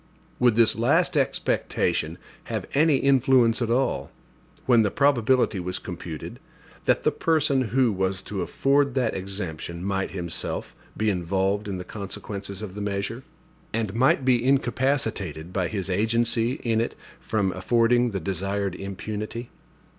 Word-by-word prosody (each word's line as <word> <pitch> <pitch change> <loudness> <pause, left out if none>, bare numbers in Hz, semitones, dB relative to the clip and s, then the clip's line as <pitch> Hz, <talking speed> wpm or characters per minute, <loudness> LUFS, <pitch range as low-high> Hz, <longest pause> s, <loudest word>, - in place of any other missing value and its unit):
Would 120 -3 +4
this 115 -1 +5
last 160 +10 +2
expectation 85 - 0 0.3
have - - -3
any 150 0 +4
influence 130 -4 +4
at 115 - 0
all, 125 +2 0 0.6
when 120 -3 +5
the 105 - +2
probability 130 -5 +2
was 90 +1 -2
computed, 85 -3 -7 0.5
that - - +2
the - - +3
person 145 -5 +1
who 125 +1 +3
was 95 -1 -1
to 100 -3 -4
afford 140 +7 +1
that 125 -4 +1
exemption 90 -3 -5
might 95 -1 -1
himself 85 -3 -4 0.2
be 110 -1 +2
involved 95 +3 0
in 95 -2 -3
the 90 - -5
consequences 100 0 -6
of 100 -4 -6
the 105 - -6
measure, 100 +4 -3 0.5
and 110 -3 -1
might 130 +2 +3
be 125 -2 +3
incapacitated 120 - 0
by 95 -3 0
his 95 -2 -3
agency 115 +4 +1
in 115 -2 +1
it 115 - -3 0.2
from 100 -4 0
affording 120 +5 +2
the 100 -3 -3
desired 95 +2 -2
impunity? 105 +5 -5
110 Hz, 140 wpm, -25 LUFS, 95-125 Hz, 0.6 s, this